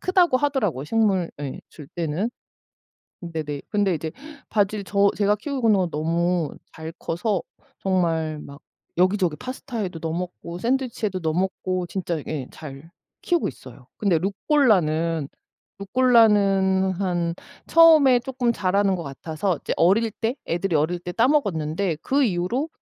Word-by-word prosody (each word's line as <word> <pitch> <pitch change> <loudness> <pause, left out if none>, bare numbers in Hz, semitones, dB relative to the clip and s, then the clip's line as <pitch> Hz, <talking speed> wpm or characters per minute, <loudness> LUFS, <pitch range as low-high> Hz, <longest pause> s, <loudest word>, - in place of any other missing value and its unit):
크다고 365 -6 +3
하더라고요 255 - 0
식물 195 -3 +1
예 140 -2 -5
줄 150 - -12
때는. 170 +7 -2 0.9
으 170 - -6
네네. 150 -3 -4
근데 205 -3 +1
이제 160 +1 -4 0.4
바질 205 -1 +1
저 200 +1 +3
제가 205 0 +2
키우고 255 -1 -1
있는 205 - +5
거 180 - +1
너무 165 +1 0 0.2
잘 160 0 -7
커서 180 +6 -1 0.4
정말 165 -5 0
막 140 0 -11 0.4
여기저기 185 -3 +2
파스타에도 230 - -5
넣어 160 - -2
먹고 175 -1 -5
샌드위치에도 230 -4 -1
넣어 160 -2 -1
먹고 185 0 -1
진짜 175 -3 -3
예 145 -5 -4
잘 150 +2 -10 0.3
키우고 345 -2 +1
있어요. 125 0 -11
근데 195 -6 +2
루꼴라는, 170 - +1 0.5
루꼴라는 200 -4 +3
한 175 -3 -1 0.3
처음에 310 -7 +7
쪼끔 245 -1 -1
자라는 195 -1 +1
것 170 - -5
같아서 160 +5 -3
이제 - - -2
어릴 215 +6 +3
때 225 +4 -2
애들이 175 +1 -1
어릴 160 +4 +1
때 175 0 -6
따 240 +4 +3
먹었는데 175 - 0
그 275 +1 +2
이후로 215 - -1
185 Hz, 305 characters per minute, -23 LUFS, 165-225 Hz, 0.9 s, 처음에